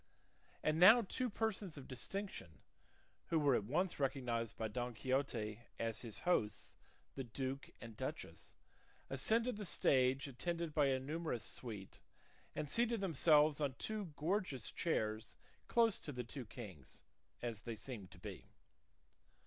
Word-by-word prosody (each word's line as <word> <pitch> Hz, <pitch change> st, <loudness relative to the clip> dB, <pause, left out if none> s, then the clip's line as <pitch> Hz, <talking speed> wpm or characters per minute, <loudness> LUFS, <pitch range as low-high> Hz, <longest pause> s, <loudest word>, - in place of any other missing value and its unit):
And 155 Hz, +1 st, +2 dB
now 220 Hz, +7 st, +10 dB
two 250 Hz, +5 st, -1 dB
persons 205 Hz, -6 st, -2 dB
of 135 Hz, -, -8 dB
distinction, 130 Hz, -, -5 dB, 0.6 s
who 165 Hz, -, +2 dB
were 145 Hz, -3 st, +4 dB
at 105 Hz, -, +2 dB
once 170 Hz, -, 0 dB
recognised 125 Hz, -5 st, 0 dB
by 110 Hz, -, -1 dB
Don 120 Hz, +2 st, -3 dB
Quixote 120 Hz, -4 st, 0 dB, 0.2 s
as 115 Hz, -1 st, -1 dB
his 115 Hz, -4 st, -4 dB
hosts 110 Hz, -, +1 dB, 0.4 s
the 135 Hz, -, -4 dB
duke 130 Hz, +3 st, -4 dB
and 115 Hz, -2 st, -9 dB
duchess, -, -, -5 dB, 0.6 s
ascended 225 Hz, -, +2 dB
the 210 Hz, -, -4 dB
stage 135 Hz, -5 st, +3 dB
attended 165 Hz, +4 st, -2 dB
by 150 Hz, -2 st, +4 dB
a 130 Hz, -1 st, +2 dB
numerous 150 Hz, -2 st, -2 dB
suite, 105 Hz, -6 st, -7 dB, 0.6 s
and 150 Hz, -, -2 dB
seated 235 Hz, +6 st, +2 dB
themselves 155 Hz, -4 st, +5 dB
on 140 Hz, -3 st, 0 dB
two 215 Hz, +4 st, -3 dB
gorgeous 165 Hz, -, 0 dB
chairs 110 Hz, -9 st, -1 dB, 0.3 s
close 230 Hz, -3 st, +4 dB
to 150 Hz, -, -6 dB
the 125 Hz, -2 st, -3 dB
two 125 Hz, +2 st, -7 dB
kings, 95 Hz, -, -9 dB, 0.4 s
as 115 Hz, -3 st, -3 dB
they 115 Hz, 0 st, -4 dB
seemed 110 Hz, -5 st, -6 dB
to -, -, -14 dB
be. -, -, -8 dB
135 Hz, 140 wpm, -39 LUFS, 115-170 Hz, 0.6 s, now